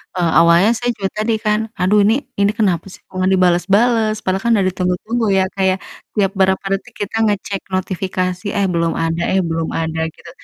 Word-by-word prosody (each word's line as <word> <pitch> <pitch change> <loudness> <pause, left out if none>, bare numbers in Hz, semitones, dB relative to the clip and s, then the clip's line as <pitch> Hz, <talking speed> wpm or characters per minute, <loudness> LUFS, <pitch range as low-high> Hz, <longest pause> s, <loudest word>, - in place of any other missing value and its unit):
eee, 175 -3 +1
awalnya 170 +6 +5
saya 245 +2 -1
juga 195 -1 -2
tadi 220 +2 +1
kan, 210 0 +2 0.2
aduh 190 +3 +3
ini 225 - +4 0.2
ini 200 +1 +3
kenapa 190 -5 +1
sih - - -15
kok - - -18
nggak 185 +1 +2
dibalas-balas, 205 +5 +2
padahal 190 +1 0
kan 235 - +1
udah 195 -3 +2
ditunggu-tunggu 185 +6 -1
ya, 190 - +3
Kak, 195 - -2
ya, - - +1 0.4
tiap 195 -3 +2
berapa 190 0 +2
detik 195 - -5
kita 200 - -7
ngecek 200 -1 -2
notifikasi, 185 0 -2
eh 200 - +2
belum 170 -1 0
ada 165 +1 -1
eh 190 - +3
belum 165 0 -2
ada, 160 0 -2 0.2
gitu. 170 - -14
190 Hz, 195 wpm, -18 LUFS, 180-210 Hz, 0.4 s, awalnya